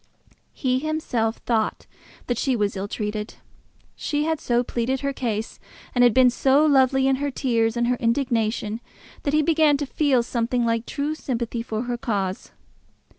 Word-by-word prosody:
He 255 Hz, -2 st, 0 dB
himself 260 Hz, -7 st, -1 dB
thought 225 Hz, -3 st, 0 dB, 0.4 s
that 245 Hz, -2 st, -1 dB
she 265 Hz, -2 st, +1 dB
was 205 Hz, -2 st, 0 dB
ill 195 Hz, +1 st, -3 dB
treated. 210 Hz, 0 st, -4 dB, 0.6 s
She 295 Hz, 0 st, -1 dB
had 320 Hz, 0 st, 0 dB
so 240 Hz, 0 st, +1 dB
pleaded 250 Hz, +2 st, -2 dB
her 280 Hz, 0 st, -1 dB
case, 225 Hz, -4 st, -3 dB, 0.3 s
and 245 Hz, -, +4 dB
had 245 Hz, -, +6 dB
been 255 Hz, +2 st, +5 dB
so 275 Hz, +4 st, +3 dB
lovely 265 Hz, -2 st, +4 dB
in 270 Hz, -1 st, +3 dB
her 285 Hz, +1 st, -1 dB
tears 235 Hz, -4 st, 0 dB
and 240 Hz, -, +2 dB
her 245 Hz, +1 st, +1 dB
indignation, 230 Hz, -3 st, 0 dB, 0.4 s
that 285 Hz, +1 st, 0 dB
he 305 Hz, -, +4 dB
began 310 Hz, -2 st, +4 dB
to 290 Hz, -, -2 dB
feel 270 Hz, -2 st, +2 dB
something 235 Hz, +1 st, -1 dB
like 230 Hz, 0 st, 0 dB
true 290 Hz, +2 st, -2 dB
sympathy 235 Hz, -5 st, -3 dB
for 225 Hz, -1 st, -3 dB
her 245 Hz, -1 st, -3 dB
cause. 195 Hz, -5 st, -2 dB
245 Hz, 170 wpm, -24 LUFS, 230-275 Hz, 0.6 s, had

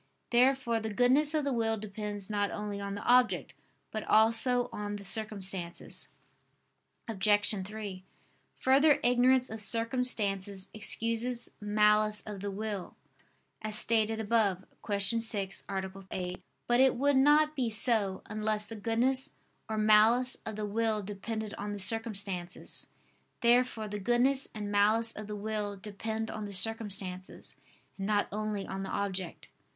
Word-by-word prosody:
Therefore 250 Hz, -1 st, +2 dB
the 220 Hz, 0 st, -5 dB
goodness 265 Hz, +7 st, +3 dB
of 305 Hz, -, +1 dB
the 280 Hz, -1 st, -1 dB
will 225 Hz, -1 st, 0 dB
depends 205 Hz, -1 st, -6 dB
not 205 Hz, -1 st, -1 dB
only 205 Hz, -1 st, -5 dB
on 200 Hz, 0 st, -4 dB
the 205 Hz, -, -7 dB
object, 250 Hz, 0 st, +2 dB, 0.4 s
but 215 Hz, -, -4 dB
also 230 Hz, +3 st, +3 dB
on 205 Hz, 0 st, -5 dB
the 200 Hz, -1 st, -9 dB
circumstances. 195 Hz, -4 st, -1 dB, 1.0 s
Obj. 205 Hz, -1 st, +2 dB, 0.2 s
3: 205 Hz, -3 st, -7 dB, 0.5 s
Further, 280 Hz, +3 st, +4 dB
ignorance 250 Hz, +1 st, +3 dB
of 220 Hz, 0 st, -7 dB
circumstances 205 Hz, -4 st, +1 dB
excuses 230 Hz, +2 st, -2 dB
malice 210 Hz, 0 st, +2 dB
of 210 Hz, -2 st, -7 dB
the 200 Hz, +1 st, -4 dB
will, 205 Hz, -1 st, -5 dB, 0.7 s
as 215 Hz, 0 st, -1 dB
stated 220 Hz, -1 st, +2 dB
above 205 Hz, -4 st, 0 dB, 0.2 s
(Q. 200 Hz, -1 st, -2 dB, 0.2 s
6, 205 Hz, -4 st, 0 dB
A. 190 Hz, -1 st, -3 dB, 0.2 s
8). 180 Hz, -1 st, -5 dB, 0.2 s
But 240 Hz, 0 st, +2 dB
it 265 Hz, 0 st, +4 dB
would 280 Hz, +2 st, +2 dB
not 300 Hz, +3 st, +4 dB
be 255 Hz, -5 st, -1 dB
so, 215 Hz, -4 st, +1 dB
unless 215 Hz, 0 st, -1 dB
the 225 Hz, -, -9 dB
goodness 235 Hz, +5 st, +1 dB, 0.3 s
or 220 Hz, -, -2 dB
malice 220 Hz, +4 st, +4 dB
of 220 Hz, -, -4 dB
the 215 Hz, 0 st, -3 dB
will 215 Hz, 0 st, -1 dB
depended 210 Hz, +2 st, -5 dB
on 205 Hz, 0 st, -4 dB
the -, -, -5 dB
circumstances. 200 Hz, -4 st, -1 dB, 0.5 s
Therefore 240 Hz, -2 st, +2 dB
the 210 Hz, 0 st, -5 dB
goodness 245 Hz, +6 st, +2 dB
and 205 Hz, -1 st, -5 dB
malice 215 Hz, +3 st, +3 dB
of 215 Hz, -1 st, -8 dB
the 210 Hz, -, -5 dB
will 210 Hz, -1 st, -3 dB
depend 220 Hz, +2 st, -5 dB
on 215 Hz, -1 st, -5 dB
the 200 Hz, -, -7 dB
circumstances, 195 Hz, -3 st, 0 dB, 0.4 s
and 195 Hz, -, -3 dB
not 210 Hz, -1 st, +1 dB
only 210 Hz, -1 st, -3 dB
on 190 Hz, 0 st, -5 dB
the 195 Hz, -, -5 dB
object. 190 Hz, -3 st, -4 dB
215 Hz, 145 wpm, -30 LUFS, 205-230 Hz, 1.0 s, Further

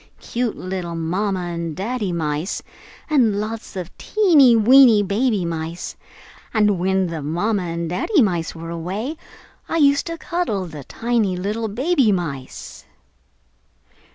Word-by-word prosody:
Cute 240 Hz, -2 st, -3 dB
little 180 Hz, -2 st, -4 dB
Mama 185 Hz, +4 st, -1 dB
and 170 Hz, -2 st, -4 dB
Daddy 210 Hz, 0 st, -2 dB
mice, 160 Hz, +1 st, -2 dB, 0.4 s
and 235 Hz, -10 st, +3 dB
lots 215 Hz, 0 st, -5 dB
of 180 Hz, -2 st, -5 dB
little -, -, -32 dB, 0.3 s
teeny 285 Hz, -, +7 dB
weeny 230 Hz, -1 st, +7 dB
baby 205 Hz, -1 st, 0 dB
mice. 165 Hz, +1 st, -4 dB, 0.6 s
And 210 Hz, -4 st, +3 dB
when 190 Hz, +1 st, +1 dB
the 165 Hz, -3 st, -4 dB
mama 185 Hz, +8 st, -1 dB
and 170 Hz, -1 st, -3 dB
daddy 190 Hz, -, +1 dB
mice 175 Hz, -6 st, -1 dB
were 165 Hz, 0 st, -7 dB
away, 190 Hz, -, -4 dB, 0.5 s
I 330 Hz, -, 0 dB
used 280 Hz, -1 st, +3 dB
to 335 Hz, 0 st, -4 dB
cuddle 320 Hz, -, -2 dB
the 150 Hz, -5 st, -9 dB
tiny 225 Hz, -5 st, 0 dB
little 210 Hz, +5 st, -2 dB
baby 260 Hz, -, +2 dB
mice!" 145 Hz, -9 st, -5 dB
200 Hz, 135 wpm, -21 LUFS, 170-235 Hz, 0.6 s, teeny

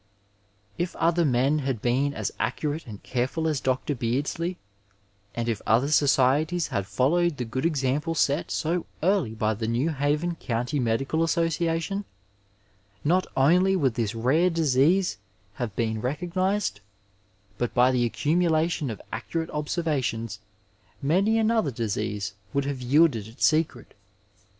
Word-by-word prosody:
If 175 Hz, +1 st, -2 dB
other 170 Hz, +1 st, +2 dB
men 135 Hz, +2 st, +2 dB
had 135 Hz, -5 st, -2 dB
been 135 Hz, +5 st, 0 dB
as 110 Hz, -, -2 dB
accurate 145 Hz, +8 st, -2 dB
and 105 Hz, -3 st, -9 dB
careful 130 Hz, +6 st, -1 dB
as 150 Hz, -4 st, 0 dB
Dr. 130 Hz, +3 st, 0 dB
Beardsley, 145 Hz, +9 st, -2 dB, 0.8 s
and 120 Hz, 0 st, -2 dB
if 115 Hz, -4 st, -1 dB
other 120 Hz, +6 st, +3 dB
societies 145 Hz, +4 st, +3 dB
had 100 Hz, -1 st, -2 dB
followed 165 Hz, +7 st, +1 dB
the 125 Hz, -, -3 dB
good 130 Hz, +7 st, -1 dB
example 150 Hz, +2 st, -1 dB
set 145 Hz, 0 st, +1 dB
so 170 Hz, +2 st, -1 dB, 0.2 s
early 175 Hz, -, +1 dB
by 110 Hz, 0 st, 0 dB
the 110 Hz, +1 st, -4 dB
New 125 Hz, +8 st, 0 dB
Haven 150 Hz, +4 st, 0 dB
County 125 Hz, +3 st, -2 dB
Medical 135 Hz, +6 st, 0 dB
Association, 165 Hz, +3 st, 0 dB, 1.0 s
not 180 Hz, +5 st, +2 dB
only 180 Hz, +8 st, +4 dB
would 140 Hz, -9 st, +1 dB
this 115 Hz, -2 st, -2 dB
rare 140 Hz, +10 st, +3 dB
disease 165 Hz, +3 st, +2 dB, 0.3 s
have 110 Hz, -3 st, -4 dB
been 110 Hz, -2 st, -1 dB
recognized, 180 Hz, -, -1 dB, 0.8 s
but 120 Hz, -, 0 dB
by 125 Hz, +1 st, +5 dB
the 125 Hz, -1 st, +1 dB
accumulation 160 Hz, +3 st, +1 dB
of 110 Hz, -, -5 dB
accurate 160 Hz, +9 st, -3 dB
observations 145 Hz, -, -2 dB, 0.6 s
many 195 Hz, +10 st, +2 dB
another 225 Hz, -6 st, +2 dB
disease 105 Hz, -4 st, -3 dB, 0.2 s
would 140 Hz, -1 st, +1 dB
have 140 Hz, -2 st, -3 dB
yielded 130 Hz, -4 st, +3 dB
its 115 Hz, +4 st, -1 dB
secret. 155 Hz, -6 st, 0 dB
145 Hz, 135 wpm, -26 LUFS, 120-165 Hz, 1.0 s, by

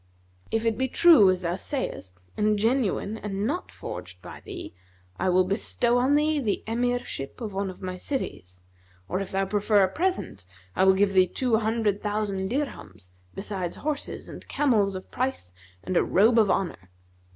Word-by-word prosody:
If 225 Hz, 0 st, -1 dB
it 225 Hz, 0 st, +1 dB
be 260 Hz, -, +1 dB
true, 260 Hz, -, +7 dB
as 185 Hz, -1 st, +1 dB
thou 170 Hz, -1 st, -1 dB
sayest, 175 Hz, -, -5 dB
and 210 Hz, 0 st, +2 dB
genuine 220 Hz, -1 st, 0 dB
and 200 Hz, 0 st, -3 dB
not 340 Hz, +10 st, -2 dB
forged 90 Hz, 0 st, -8 dB
by -, -, -10 dB
thee, -, -, -8 dB, 0.5 s
I -, -, +1 dB
will 185 Hz, +1 st, +4 dB
bestow 235 Hz, +5 st, 0 dB
on 265 Hz, +4 st, +3 dB
thee 300 Hz, 0 st, +2 dB
the 220 Hz, -7 st, -1 dB
Emirship 240 Hz, -, -2 dB
of 220 Hz, -5 st, -5 dB
one 195 Hz, 0 st, -2 dB
of 185 Hz, -, -10 dB
my 185 Hz, 0 st, -4 dB
cities; 90 Hz, -, -5 dB, 0.5 s
or, 185 Hz, -, -1 dB
if 195 Hz, -, -5 dB
thou 195 Hz, 0 st, 0 dB
prefer 205 Hz, 0 st, +3 dB
a -, -, +4 dB
present, 340 Hz, -, -2 dB, 0.3 s
I 190 Hz, -, +3 dB
will 190 Hz, 0 st, +6 dB
give 195 Hz, 0 st, +2 dB
thee 185 Hz, -1 st, +5 dB
two 245 Hz, 0 st, +1 dB
hundred 220 Hz, -2 st, 0 dB
thousand 205 Hz, -2 st, -2 dB
dirhams, 245 Hz, -, -5 dB, 0.2 s
besides 195 Hz, -3 st, -4 dB
horses 295 Hz, -1 st, -4 dB
and -, -, -10 dB
camels 215 Hz, -9 st, +2 dB
of 185 Hz, -, -8 dB
price 250 Hz, -, -3 dB, 0.3 s
and 185 Hz, -, -3 dB
a -, -, +4 dB
robe 225 Hz, +5 st, +4 dB
of 210 Hz, -3 st, +4 dB
honour. 130 Hz, -, -1 dB
205 Hz, 175 wpm, -26 LUFS, 185-245 Hz, 0.5 s, true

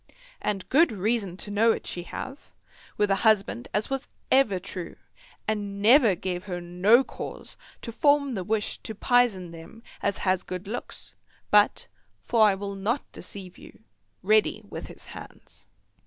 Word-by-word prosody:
And 195 Hz, -3 st, -2 dB
good 315 Hz, +2 st, +5 dB
reason 205 Hz, -2 st, -1 dB
to 205 Hz, -, -4 dB
know 225 Hz, +3 st, +4 dB
it -, -, -7 dB
she 175 Hz, -, -3 dB
have, 265 Hz, +10 st, -8 dB, 0.5 s
with 210 Hz, -1 st, +2 dB
a 195 Hz, -, +3 dB
husband 200 Hz, -, +2 dB
as 210 Hz, +5 st, -1 dB
was 270 Hz, 0 st, -2 dB, 0.2 s
ever 230 Hz, -8 st, +4 dB
true, 180 Hz, -2 st, -7 dB, 0.5 s
and 205 Hz, -2 st, -2 dB
never 225 Hz, -1 st, +6 dB
gave 180 Hz, +1 st, -4 dB
her 180 Hz, -3 st, -4 dB
no 180 Hz, +8 st, +4 dB
cause -, -, -8 dB, 0.3 s
to 230 Hz, -, -5 dB
form 285 Hz, +1 st, +3 dB
the 190 Hz, -5 st, -3 dB
wish 215 Hz, +2 st, -1 dB
to 220 Hz, -, -6 dB
pizen 220 Hz, -7 st, +2 dB
them 165 Hz, +8 st, -12 dB, 0.2 s
as 200 Hz, -, 0 dB
has 185 Hz, -1 st, +2 dB
good 185 Hz, +1 st, -7 dB
looks, 240 Hz, +4 st, -7 dB, 0.4 s
but, 210 Hz, 0 st, +4 dB, 0.3 s
for 220 Hz, -2 st, +4 dB
I 200 Hz, -, +3 dB
will 200 Hz, +1 st, -5 dB
not 210 Hz, +8 st, -2 dB
deceive 185 Hz, -3 st, -8 dB
you, -, -, -15 dB, 0.4 s
ready 215 Hz, +1 st, +3 dB
with -, -, -7 dB
his -, -, -12 dB
hands. -, -, -12 dB
205 Hz, 160 wpm, -26 LUFS, 185-230 Hz, 0.5 s, never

